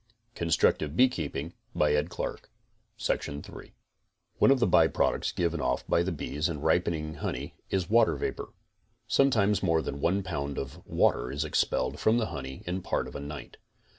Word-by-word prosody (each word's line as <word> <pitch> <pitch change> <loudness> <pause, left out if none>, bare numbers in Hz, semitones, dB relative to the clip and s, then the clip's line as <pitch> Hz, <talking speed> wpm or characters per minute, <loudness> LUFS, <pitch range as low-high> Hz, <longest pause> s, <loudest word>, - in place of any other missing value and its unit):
CONSTRUCTIVE 80 -3 +1
BEEKEEPING 85 - +1 0.2
19 75 0 +3 1.1
EVAPORATION 70 +1 -1 1.0
One - - +6
of 135 -1 +5
the 120 - +4
by 90 - +5
products - - 0
given 85 -2 -1
off 65 -1 0
by - - +2
the 90 +2 -1
bees 75 0 -2
in 75 -3 -4
ripening 80 -1 +1
honey - - -3 0.2
is 95 -3 0
water 115 +4 +4
vapor. - - -4 0.6
Sometimes 110 -7 +3
more 80 -4 +2
than 70 +1 -5
one 95 +3 +1
pound 70 -6 -3
of 70 -1 -6
water - - +2
is 75 +3 -2
expelled 75 - 0
from 110 +2 +3
the 115 - +1
honey 65 -1 -6
in 90 +2 -2
part - - -1
of - - -11
a - - -4
night. 70 -1 -8
80 Hz, 160 wpm, -29 LUFS, 70-95 Hz, 1.1 s, One